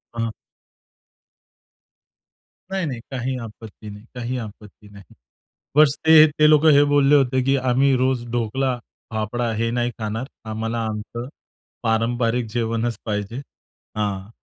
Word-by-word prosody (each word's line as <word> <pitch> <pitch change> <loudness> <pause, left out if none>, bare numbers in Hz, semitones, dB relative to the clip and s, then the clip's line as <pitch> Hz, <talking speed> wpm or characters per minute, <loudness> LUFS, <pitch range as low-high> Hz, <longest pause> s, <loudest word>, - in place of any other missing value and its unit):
हां. 115 -1 -2 2.4
नाही, 190 -3 -1
नाही. 130 -5 -4
काही 130 0 -2
आपत्ती 110 -1 -10
नाही, 105 +1 -11
काही 125 +1 -3
आपत्ती 105 -2 -10
नाही. 100 -1 -15 0.6
बस 150 -2 +5
ते 160 -1 +9
ते 155 - +6
लोकं 155 +1 +6
हे 145 0 +6
बोलले 145 0 +5
होते, 130 -1 +2
की 135 +2 +2
आम्ही 130 +1 +2
रोज 130 -1 0
ढोकला 120 +3 -1 0.3
फाफडा 115 +2 -2
हे 115 +1 0
नाही 120 0 0
खाणार. 110 +3 -3 0.2
आम्हाला 115 +2 -3
आमचं 110 +3 -5 0.5
पारंपरिक 115 +1 0
जेवणच 115 0 -1
पाहिजे. 105 0 -3 0.6
हां. 100 -2 -2
120 Hz, 125 wpm, -22 LUFS, 110-130 Hz, 2.4 s, ते